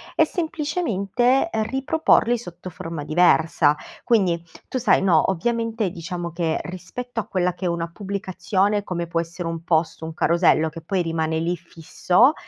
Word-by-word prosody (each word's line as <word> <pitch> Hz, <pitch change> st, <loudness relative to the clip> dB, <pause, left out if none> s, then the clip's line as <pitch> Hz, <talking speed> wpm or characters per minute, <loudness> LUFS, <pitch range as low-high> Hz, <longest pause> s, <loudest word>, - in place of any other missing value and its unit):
e -, -, +5 dB
semplicemente 290 Hz, -, 0 dB
riproporli 265 Hz, +1 st, +2 dB
sotto 180 Hz, -4 st, -9 dB
forma 165 Hz, -2 st, -6 dB
diversa. 160 Hz, -1 st, +3 dB, 0.3 s
Quindi, 190 Hz, -8 st, +2 dB, 0.3 s
tu -, -, -3 dB
sai 250 Hz, -, +3 dB
no, 185 Hz, -1 st, +3 dB
ovviamente 230 Hz, +2 st, -1 dB
diciamo 170 Hz, 0 st, -5 dB
che, 165 Hz, -1 st, -1 dB
rispetto 225 Hz, +7 st, -6 dB
a -, -, -3 dB
quella 180 Hz, -1 st, 0 dB
che 185 Hz, -, -5 dB
è -, -, +2 dB
una 170 Hz, 0 st, -2 dB
pubblicazione 195 Hz, +1 st, -1 dB
come 170 Hz, -3 st, -3 dB
può 165 Hz, 0 st, -1 dB
essere 170 Hz, +1 st, -4 dB
un 165 Hz, 0 st, -4 dB
post, 165 Hz, -1 st, 0 dB
un 160 Hz, 0 st, -5 dB
carosello 165 Hz, -1 st, +3 dB
che 165 Hz, +1 st, -9 dB
poi 185 Hz, +3 st, -1 dB
rimane 160 Hz, -1 st, -1 dB
lì, 170 Hz, +2 st, 0 dB
fisso, 175 Hz, -, +2 dB
180 Hz, 155 wpm, -23 LUFS, 165-220 Hz, 0.3 s, e